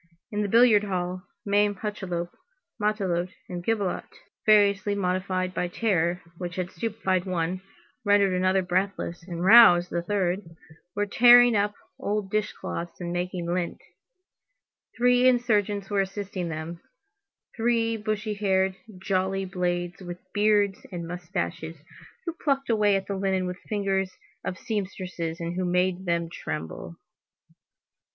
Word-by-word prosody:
In 210 0 -1
the 205 - 0
billiard 225 -2 +5
hall, 180 -1 -3 0.2
Mame 205 0 +2
Hucheloup, 180 -4 -4 0.5
Matelote, 185 -4 0
and 175 -1 -6
Gibelotte, 205 -3 -1 0.4
variously 205 -1 +4
modified 185 -1 -1
by 180 +1 -1
terror, 175 -3 0 0.2
which 175 -2 -5
had 185 -1 -3
stupefied 200 -5 -1
one, 180 0 -2 0.4
rendered 205 -2 +4
another 185 +1 +2
breathless, 180 -1 -1
and 175 -1 -3
roused 190 -5 +8
the 170 - -1
third, 185 0 0 0.5
were 205 0 +1
tearing 240 +2 +7
up 205 0 +1 0.2
old 205 -1 -2
dish 215 0 0
cloths 170 0 -6
and 175 -1 -4
making 175 0 -3
lint; 175 -1 -2 1.2
three 245 +1 +4
insurgents 210 -5 +1
were 200 -1 +3
assisting 195 -2 -4
them, 165 +2 -6 0.7
three 230 0 +1
bushy 215 0 -2
haired, 190 -2 +1 0.3
jolly 190 0 0
blades 180 -1 -2
with 175 -1 -6 0.2
beards 205 -1 +2
and 170 -2 -5
moustaches, 175 -1 -4 0.5
who 335 - -2
plucked 275 -3 +1
away 210 -2 +3
at 195 0 -1
the 200 - -3
linen 190 -1 0
with 180 0 -4
the - - -24
fingers 195 -2 -1 0.3
of 185 - -4
seamstresses 185 -5 -4
and 170 +1 -4
who 185 - 0
made 180 +1 +1
them 170 -1 0
tremble. 80 - -6
190 Hz, 135 wpm, -26 LUFS, 175-205 Hz, 1.2 s, roused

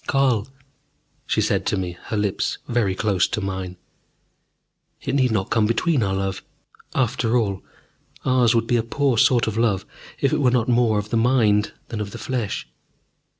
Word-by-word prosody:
"Carl," 130 -6 +2 0.8
she - - +1
said - - +1
to - - 0
me, 90 -2 -3
her 110 - -3
lips 105 -2 -1
very 110 -6 +1
close 100 -3 +1
to - - -3
mine, 95 -2 -4 1.2
"it - - -4
need 130 -2 +3
not 105 -4 -1
come 110 -2 +3
between 130 +5 +1
our 95 -2 0
love. 95 0 -2 0.5
After 125 -1 +1
all, 100 -5 -1 0.6
ours 125 -3 +3
would 115 0 +2
be 120 - +2
a - - +2
poor 125 +1 0
sort 120 0 +4
of 110 0 -2
love 100 -5 +1 0.3
if - - +1
it - - +1
were 130 - +4
not 120 -2 +1
more 120 -3 +3
of 105 +1 -3
the 115 - +2
mind 115 -4 +3 0.2
than 115 -3 -4
of 105 - -4
the - - -8
flesh. 120 -6 -3
110 Hz, 180 wpm, -22 LUFS, 100-125 Hz, 1.2 s, sort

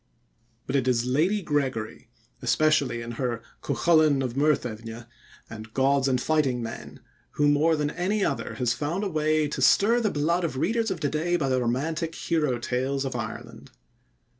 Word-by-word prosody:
But 135 - -3
it 130 -2 +1
is 120 -2 +2
Lady 170 +11 +1
Gregory, 130 -9 -2 0.3
especially 125 -1 +2
in 115 - -6
her 120 -3 -2 0.2
Cuchulain 155 -5 +3
of 125 -2 -3
Muirthemne 120 -6 -1 0.4
and 110 0 -10
Gods 135 0 +2
and 130 -2 +1
Fighting 140 -3 +1
Men, 115 0 -8 0.3
who 145 - +2
more 150 +3 +3
than 150 -1 -1
any 195 +5 0
other - - -3
has 125 -2 0
found 165 - -2
a - - 0
way 155 -1 +1
to - - -4
stir 230 +4 +4
the 220 -3 +1
blood 170 +4 0
of 160 -6 -2
readers 225 - 0
of 190 - -3
to 145 - +1
day 165 +3 0
by 145 -6 0
the 130 -1 +1
romantic 155 +7 -2
hero 150 -7 0
tales 130 +3 -2
of 135 - -4
Ireland. - - -7
145 Hz, 170 wpm, -26 LUFS, 125-160 Hz, 0.4 s, stir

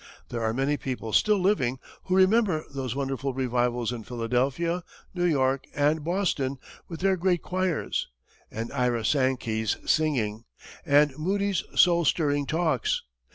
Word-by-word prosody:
There 120 - -4
are 110 0 +1
many 135 +5 0
people 125 -5 -5
still 210 -1 +4
living 165 -10 +1 0.3
who 185 - +1
remember 190 -4 +3
those 130 -3 -3
wonderful 135 -1 -2
revivals 125 -2 0
in 120 -2 -6
Philadelphia, 130 +10 -1 0.3
New 175 -1 0
York, 135 -5 +1
and 150 +2 +2
Boston, 160 -6 -1 0.3
with 165 -1 -8
their 190 0 +3
great 180 -1 0
choirs, 185 -2 -1 0.4
and 115 +1 -5
Ira 125 -4 0
Sankey's 120 -5 0
singing, 120 -8 0 0.4
and 145 -1 +4
Moody's 200 +3 0
soul 170 -1 +5
stirring 145 -3 +1
talks. 160 -6 0
140 Hz, 135 wpm, -26 LUFS, 125-175 Hz, 0.4 s, soul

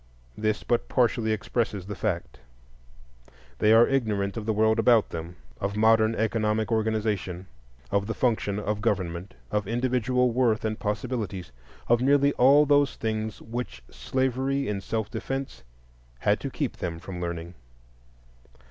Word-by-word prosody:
This 110 0 -1
but 120 - 0
partially 115 -3 +2
expresses 110 -2 -2
the 105 - -5
fact. 90 - -3 1.2
They 105 - +4
are 115 +1 +7
ignorant 105 -7 0
of 110 -2 -5
the - - +3
world 110 +1 +2
about 115 -2 +4
them, 85 +1 -6 0.2
of 100 +1 -2
modern 110 0 +4
economic 110 0 0
organization, 105 -5 -1 0.5
of 100 0 +1
the 115 - -3
function 110 -5 0
of 105 0 -2
government, 95 -4 -2 0.2
of 105 -2 -1
individual 125 +1 +1
worth 115 -3 +1
and 110 -1 -2
possibilities,—of 105 - -3
nearly 140 +2 +4
all 140 +4 +6
those 145 -1 +3
things 110 -2 -3
which 115 - -6
slavery 130 +1 -1
in 100 -2 -2
self 110 +1 -3
defence 135 0 -4 0.6
had - - +2
to - - -4
keep - - -3
them 85 -2 -4
from 90 +1 -7
learning. 85 0 -4
110 Hz, 140 wpm, -26 LUFS, 100-120 Hz, 1.2 s, are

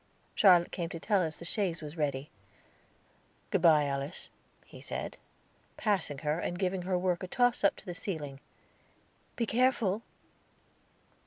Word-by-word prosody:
Charlotte 180 -4 +6
came 170 -2 -3
to 165 - -6
tell 200 +2 +2
us 160 -2 -2
that - - -15
the - - -7
chaise 175 -3 0
was 150 +1 -7
ready. 145 -3 -2 1.2
"Good - - +2
bye, 155 -3 +6
Alice," 140 +3 -3 0.3
he - - -13
said, - - -4 0.6
passing 190 -9 0
her, 150 +2 +1
and 175 - -3
giving 185 0 0
her 180 0 0
work 180 -1 0
a 185 - -4
toss 245 +4 +2
up 200 - +4
to - - -15
the 180 - -4
ceiling. 150 -7 -5 1.0
"Be 235 - 0
careful." 225 -4 +2
175 Hz, 155 wpm, -31 LUFS, 155-195 Hz, 1.2 s, Charlotte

